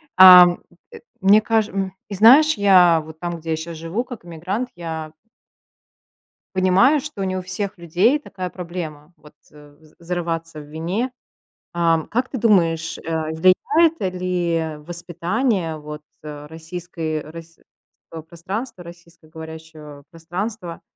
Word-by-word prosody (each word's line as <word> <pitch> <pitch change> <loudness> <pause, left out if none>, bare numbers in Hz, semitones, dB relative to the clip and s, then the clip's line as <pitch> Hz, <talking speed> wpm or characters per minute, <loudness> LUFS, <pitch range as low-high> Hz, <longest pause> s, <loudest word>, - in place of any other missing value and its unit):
Ам, 180 -1 +9 0.3
э, 460 - -10 0.2
мне 200 +3 +5
каж 220 -1 +1
м, 195 -1 -3 0.2
и, 200 - -5
знаешь, 270 +10 +7
я 180 -5 +5
вот 160 0 -12
там, 175 -1 -4
где 165 +1 -9
я - - +1
сейчас 165 +1 -7
живу, 165 +9 -3
как 245 -6 -10
эмигрант, 185 +9 -4
я 160 -2 -6 1.4
Понимаю, 190 +11 +4
что 275 -8 -6
не 185 0 -2
у - - -3
всех 190 +2 -5
людей 180 - +2
такая 185 -10 -7
проблема, 170 -3 -8
вот, 150 - -18 0.2
э, 150 -1 -17
з 155 0 -23
зарываться 165 -2 -4
в - - -9
вине. 170 - -3 0.6
Ам, 165 -2 +1
как 245 +4 -1
ты 260 - -5
думаешь, 165 -7 +2
э, 160 -1 -3
влияет, 285 - +3
э, 190 - 0
ли 175 -3 -2
воспитание 175 - -2
вот, 150 0 -9 0.2
э, 150 -1 -9
российской, 165 0 -6
э, 150 0 -7
российского 165 0 -14
пространства, 185 +5 -6
российско-говорящего 160 -3 -12
пространства, 175 +2 -6
175 Hz, 135 wpm, -21 LUFS, 160-195 Hz, 1.4 s, Ам